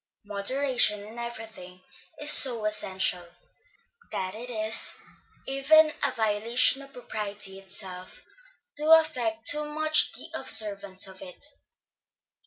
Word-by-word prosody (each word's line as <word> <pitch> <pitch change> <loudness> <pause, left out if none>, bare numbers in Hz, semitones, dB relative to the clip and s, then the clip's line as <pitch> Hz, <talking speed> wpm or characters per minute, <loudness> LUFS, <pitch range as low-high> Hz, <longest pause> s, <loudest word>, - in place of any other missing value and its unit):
Moderation 210 +1 0
in 225 +3 -11
everything 220 -6 -9 0.4
is 295 0 +2
so 235 -7 +5
essential, 190 -4 -1 0.9
that 185 0 -4
it 235 +3 -8
is 220 -2 -2 0.5
even 305 +3 +3
a 280 - +1
violation 230 +4 +2
of 275 0 -12
propriety 205 -5 -7
itself 190 -1 -8 0.5
to 305 +1 -2
affect 245 -9 +1
too 300 +1 +5
much 310 +1 +2
the - - -11
observance 200 -6 +2
of 190 -1 -9
it. 180 +9 -11
220 Hz, 110 wpm, -26 LUFS, 200-270 Hz, 0.9 s, so